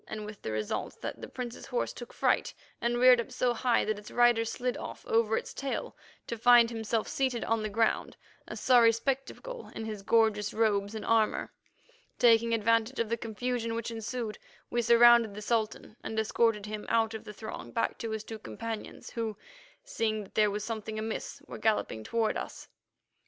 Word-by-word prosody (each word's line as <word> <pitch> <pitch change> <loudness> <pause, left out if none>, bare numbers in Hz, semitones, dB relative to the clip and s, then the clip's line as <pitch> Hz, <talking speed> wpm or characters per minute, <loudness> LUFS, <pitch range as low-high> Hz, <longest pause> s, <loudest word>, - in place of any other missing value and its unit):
with 210 -1 -9
the 110 - -4
result 110 -1 -3
that - - -5
the - - -6
Prince's 245 -2 -7
horse 245 - -1
took 240 - -9
fright, - - +1 0.3
and 240 +1 +1
reared 250 -1 +7
up 245 - -10
so 250 -1 +1
high 240 0 +2
that 215 -1 -1
its 210 - -11
rider 240 -1 +4
slid 245 +2 -2
off - - -8
over 225 -1 +2
its - - -5
tail 275 -1 -4 0.3
to 235 - -5
find 240 0 +6
himself 225 -1 -1
seated 260 -3 -1
on 225 -1 +1
the 215 - -2
ground, 225 +2 0 0.3
a - - -6
sorry 240 -3 +6
spectacle 270 - -4
in 225 - -4
his 215 -2 -5
gorgeous 210 0 +2
robes 210 -1 +1
and 220 - -5
armour. 225 -1 +1 0.6
Taking 230 -1 +5
advantage 230 +3 +2
of 230 -2 0
the 230 - +1
confusion 230 +1 -3
which 230 0 -3
ensued, 225 -1 -4 0.3
we 240 - +1
surrounded 235 -2 +6
the 210 - -6
Sultan 220 -1 -1
and 220 - -5
escorted 220 -1 +1
him 210 0 -6
out 225 -1 +2
of 220 - -6
the - - -8
throng 215 +1 -8
back 230 - -1
to 230 - -4
his 220 -1 -3
two 220 0 -8
companions, 225 0 -7
who, 225 -2 -3 0.5
seeing 220 - -1
that 195 - -16
there 210 -1 +4
was 205 +1 -3
something 220 -1 -4
amiss, 220 0 -4
were - - -8
galloping 210 - 0
toward 225 - 0
us. - - -7
225 Hz, 185 wpm, -30 LUFS, 215-235 Hz, 0.6 s, reared